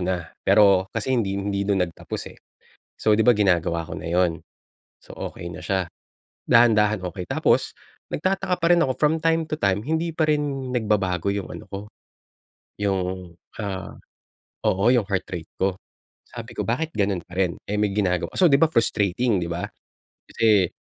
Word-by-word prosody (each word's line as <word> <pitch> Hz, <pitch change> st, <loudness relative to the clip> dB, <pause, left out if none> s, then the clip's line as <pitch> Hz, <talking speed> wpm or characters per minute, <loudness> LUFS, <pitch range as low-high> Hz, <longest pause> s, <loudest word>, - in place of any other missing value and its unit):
na 90 Hz, -2 st, -3 dB
pero 100 Hz, -3 st, +4 dB
kasi 115 Hz, +5 st, -2 dB
hindi 100 Hz, -6 st, 0 dB
hindi 100 Hz, 0 st, -2 dB
na 95 Hz, -3 st, +3 dB
nagtapos 85 Hz, -2 st, -7 dB
eh. -, -, -20 dB, 0.6 s
So, 110 Hz, -, +4 dB
'di 110 Hz, -, +2 dB
ba 125 Hz, -, +7 dB
ginagawa 85 Hz, -6 st, +1 dB
ko -, -, -6 dB
na -, -, -8 dB
'yon. 85 Hz, -2 st, +1 dB, 0.6 s
So, -, -, -23 dB
okey 85 Hz, -, -6 dB
na 80 Hz, -, -8 dB
siya, 95 Hz, -3 st, -1 dB, 0.6 s
dahan-dahan 110 Hz, -3 st, +4 dB
okey. 90 Hz, +1 st, -7 dB
Tapos, -, -, +1 dB, 0.4 s
nagtataka 185 Hz, +2 st, 0 dB
pa -, -, +1 dB
rin 175 Hz, -, +5 dB
ako 130 Hz, -, -1 dB
from 150 Hz, 0 st, +4 dB
time 165 Hz, -1 st, +2 dB
to 155 Hz, -, -2 dB
time 100 Hz, -5 st, +1 dB
hindi 160 Hz, +5 st, -1 dB
pa 155 Hz, -1 st, +1 dB
rin 145 Hz, -3 st, -1 dB
nagbabago 100 Hz, -6 st, 0 dB
yung 100 Hz, -1 st, -4 dB
ano -, -, -8 dB
ko, 100 Hz, -, -6 dB, 1.0 s
yung, 95 Hz, -3 st, -2 dB, 0.3 s
ah, 95 Hz, -3 st, -4 dB, 0.8 s
oo, 95 Hz, +1 st, +1 dB
yung 120 Hz, -6 st, +2 dB
heart 95 Hz, -2 st, -1 dB
rate 85 Hz, -3 st, -5 dB
ko. 95 Hz, 0 st, +1 dB, 0.5 s
Sabi -, -, -9 dB
ko, -, -, -2 dB
"Bakit 160 Hz, +8 st, -1 dB
ganun 100 Hz, -4 st, 0 dB
pa -, -, -19 dB
rin 90 Hz, -3 st, +1 dB
eh 105 Hz, +1 st, -2 dB
may 105 Hz, -1 st, +2 dB
ginagawa." 90 Hz, -4 st, 0 dB
So, 185 Hz, -, +5 dB
di 140 Hz, 0 st, +4 dB
ba 165 Hz, -, +5 dB
frustrating, 110 Hz, -, +1 dB
di 85 Hz, -, -3 dB
ba? 85 Hz, +1 st, -3 dB, 0.6 s
Kasi, 105 Hz, -5 st, +3 dB
100 Hz, 175 wpm, -24 LUFS, 90-125 Hz, 1.0 s, ba